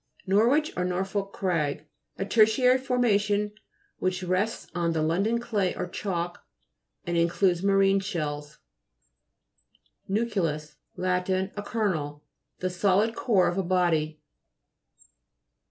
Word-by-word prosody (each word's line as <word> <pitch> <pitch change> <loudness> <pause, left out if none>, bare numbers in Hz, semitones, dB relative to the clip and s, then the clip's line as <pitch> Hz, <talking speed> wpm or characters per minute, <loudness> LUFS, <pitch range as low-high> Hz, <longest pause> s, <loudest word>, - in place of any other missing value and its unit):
NORWICH, 235 +11 +3
or 180 - -1
NORFOLK 190 +2 -2
CRAG 160 -7 -1 0.3
A 195 - -2
tertiary 230 +5 +4
formation 210 -5 +1 0.5
which 185 0 -1
rests 185 +5 -1
on 170 -1 0
the 160 - 0
London 195 +9 +1
clay 210 -6 -1
or - - -3
chalk, 175 -3 -4 0.6
and 175 - -2
in 170 0 +4
cludes 175 0 +2
marine 195 0 +4
shells 150 -6 -4 1.5
(p. 195 - -4
84). - - +3 0.3
NU'CLEUS 150 -1 -3 0.2
Lat. 180 0 -1
A 190 +2 -1
kernel. 160 -10 -2 0.4
The 185 0 -1
solid 200 +4 +2
core 200 -7 +3
of 175 - -1
a - - +1
body. 165 -4 +1
185 Hz, 120 wpm, -27 LUFS, 170-205 Hz, 1.5 s, tertiary